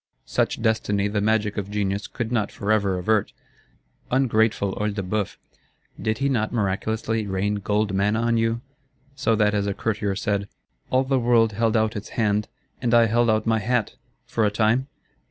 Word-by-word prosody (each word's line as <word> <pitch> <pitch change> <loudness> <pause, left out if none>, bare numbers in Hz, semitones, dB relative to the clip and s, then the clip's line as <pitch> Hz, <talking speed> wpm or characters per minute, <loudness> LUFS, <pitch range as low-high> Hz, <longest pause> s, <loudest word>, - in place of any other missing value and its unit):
Such - - -1
destiny 105 -3 +1
the 105 0 -1
magic 105 -1 +1
of 100 -1 -3
genius 100 -1 -2
could 115 -1 -4
not 110 -4 0
forever 100 -2 0
avert. 105 +3 +1 0.8
Ungrateful 110 -6 +2
Œil 105 -1 -1
de 100 - -2
Bœuf! 100 +1 -2 0.6
did 110 0 0
he 140 - 0
not 115 -6 0
miraculously 110 +1 -1
rain 100 +2 -1
gold 105 0 0
manna 100 +3 +1
on 115 0 +1
you; 115 0 0 0.5
so 115 -4 +1
that, 105 -1 +2
as 100 -1 0
a 100 - -2
Courtier 105 -3 -1
said, 100 -1 -1 0.4
'All 130 +1 +3
the 135 0 +1
world 115 -2 +3
held 115 +2 +1
out 110 +1 +1
its 105 - -6
hand, 105 -2 +1 0.3
and 120 -1 +2
I 115 -1 +6
held 120 +1 +2
out 110 0 +2
my 115 -1 +2
hat,'—for 115 0 -2
a 105 - +4
time? 110 +5 +1
110 Hz, 170 wpm, -24 LUFS, 105-115 Hz, 0.8 s, I